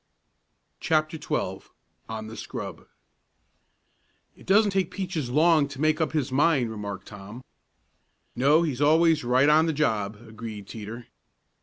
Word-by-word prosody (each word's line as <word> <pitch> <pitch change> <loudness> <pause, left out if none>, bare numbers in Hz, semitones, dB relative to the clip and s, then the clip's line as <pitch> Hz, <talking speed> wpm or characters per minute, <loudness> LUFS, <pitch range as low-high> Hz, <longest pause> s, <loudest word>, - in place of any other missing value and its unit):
CHAPTER 155 0 0
XII - - -2 0.5
ON 110 -1 -5
THE 110 +1 -9
SCRUB - - -7 1.5
"It - - -18
doesn't 205 +2 +4
take 190 -3 0
Peaches 175 -9 -4
long 155 +2 +4
to 140 -1 -10
make 155 +2 +2
up 160 - -1
his 145 -5 -1
mind," 135 -4 +2
remarked 100 -3 -6
Tom. 105 +4 -10 0.9
"No, 145 +6 +4
he's 145 -5 -2
always 160 +1 +4
right 125 +3 +3
on 155 +2 +5
the 160 - 0
job," 110 -9 0
agreed 110 -2 -8
Teeter. 115 +2 -8
140 Hz, 135 wpm, -26 LUFS, 110-160 Hz, 1.5 s, on